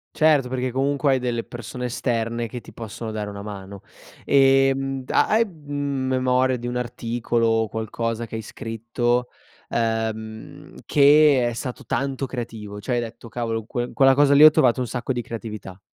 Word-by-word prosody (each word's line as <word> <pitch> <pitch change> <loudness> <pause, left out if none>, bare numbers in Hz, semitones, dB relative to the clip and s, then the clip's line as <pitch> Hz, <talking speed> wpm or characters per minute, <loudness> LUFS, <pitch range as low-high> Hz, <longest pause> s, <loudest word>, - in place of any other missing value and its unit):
Certo, 150 -5 +4
perché 130 0 -2
comunque 140 +2 +1
hai 130 - +1
delle 120 -2 -2
persone 125 +1 -7
esterne 115 -1 -2
che 120 +2 -7
ti - - -14
possono 115 0 -6
dare 105 -1 -4
una 100 0 -7
mano. 100 -1 -8 0.4
Ehm, 135 0 +3
da - - +2
hai, 225 +2 +3
mhmm, 145 -6 -4
memoria 130 0 +2
di 120 - -8
un 120 - -3
articolo 120 -1 -1
o 115 0 +2
qualcosa 115 +1 -3
che 115 - -15
hai 110 - -3
scritto, 120 +3 -2 0.4
ehm, 110 -1 -3
che 145 -3 +5
è 120 - -2
stato 125 +1 -6
tanto 135 0 -2
creativo? 115 -5 -6
Cioè, 125 - -2
hai - - +1
detto: 115 0 -8
"Cavolo! 115 -2 -3
Que 120 +1 -4
quella 135 -2 +5
cosa 140 0 +5
lì 145 +2 +7
ho 155 - +12
trovato 130 -5 +3
un 125 - -1
sacco 125 +3 -3
di 120 - -2
creatività"? 110 -5 -7
120 Hz, 175 wpm, -23 LUFS, 115-135 Hz, 0.4 s, ho